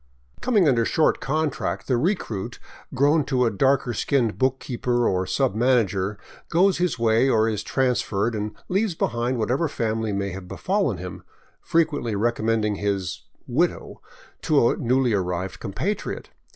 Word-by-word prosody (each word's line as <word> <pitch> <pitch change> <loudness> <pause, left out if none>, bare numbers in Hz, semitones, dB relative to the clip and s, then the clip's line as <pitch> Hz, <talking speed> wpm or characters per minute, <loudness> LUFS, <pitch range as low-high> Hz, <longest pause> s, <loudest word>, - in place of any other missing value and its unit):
Coming 210 -9 +3
under 120 -4 +3
short 155 +7 +2
contract, 155 +1 -2
the 130 - +1
recruit, 120 - -2 0.3
grown 145 +4 +3
to 130 -4 +1
a 115 - +1
darker 130 +3 +2
skinned 120 -1 +1
bookkeeper 125 -2 0
or 95 0 0
sub 135 -6 +1
manager, 105 -4 +1 0.3
goes 185 +3 +3
his 180 -5 0
way, 115 +3 +3
or 110 -3 +3
is 110 -2 -1
transferred, 120 -3 0
and 105 0 -4
leaves 195 -1 0
behind 120 -2 -1
whatever 125 +8 0
family 110 -4 -2
may 100 0 -2
have 90 0 -8
befallen - - -1
him, - - -7 0.4
frequently 150 -9 0
recommending 110 -1 0
his 100 -3 -2
" - - -40
widow 175 - -1 0.2
" - - -26
to 145 -7 +3
a - - -1
newly 125 0 +2
arrived 90 -1 -2
compatriot. 140 - -4
120 Hz, 150 wpm, -24 LUFS, 105-140 Hz, 0.4 s, Coming